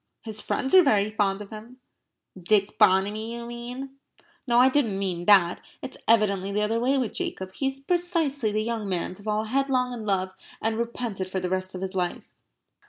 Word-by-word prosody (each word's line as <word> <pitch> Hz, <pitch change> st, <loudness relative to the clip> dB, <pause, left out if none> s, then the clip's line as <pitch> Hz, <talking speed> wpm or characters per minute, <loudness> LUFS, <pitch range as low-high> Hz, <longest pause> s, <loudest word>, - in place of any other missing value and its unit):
"His 215 Hz, -2 st, -5 dB
friends 265 Hz, -, -2 dB
are 375 Hz, -, +10 dB
very 215 Hz, -, +2 dB
fond 205 Hz, -2 st, 0 dB
of 200 Hz, -, -15 dB
him." 225 Hz, +4 st, -10 dB, 0.6 s
"Dick 195 Hz, +3 st, +1 dB
Bonamy, 210 Hz, +3 st, +3 dB
you 235 Hz, 0 st, -6 dB
mean?" 245 Hz, +3 st, -7 dB, 0.5 s
"No, 240 Hz, -1 st, +3 dB
I 250 Hz, +1 st, +7 dB
didn't 260 Hz, -7 st, +1 dB
mean 180 Hz, -3 st, -3 dB
that. 185 Hz, -4 st, +5 dB, 0.2 s
It's 265 Hz, -, -6 dB
evidently 200 Hz, -4 st, +3 dB
the 210 Hz, +1 st, 0 dB
other 225 Hz, +2 st, 0 dB
way 260 Hz, +4 st, +2 dB
with 250 Hz, -5 st, -1 dB
Jacob. 190 Hz, 0 st, -4 dB
He 270 Hz, -, -1 dB
is 270 Hz, 0 st, -3 dB
precisely 310 Hz, -6 st, 0 dB
the 215 Hz, +1 st, 0 dB
young 225 Hz, -3 st, -3 dB
man 180 Hz, -1 st, -2 dB
to 185 Hz, -, -13 dB
fall 215 Hz, +1 st, -1 dB
headlong 255 Hz, +1 st, 0 dB
in 230 Hz, -2 st, -6 dB
love 190 Hz, -2 st, -1 dB, 0.3 s
and 220 Hz, 0 st, -1 dB
repent 235 Hz, -3 st, -3 dB
it 185 Hz, -, -3 dB
for 190 Hz, -, -2 dB
the 180 Hz, 0 st, -3 dB
rest 185 Hz, 0 st, -2 dB
of 180 Hz, -, -6 dB
his 190 Hz, 0 st, -4 dB
life." 180 Hz, -2 st, -2 dB
215 Hz, 200 wpm, -26 LUFS, 195-250 Hz, 0.6 s, are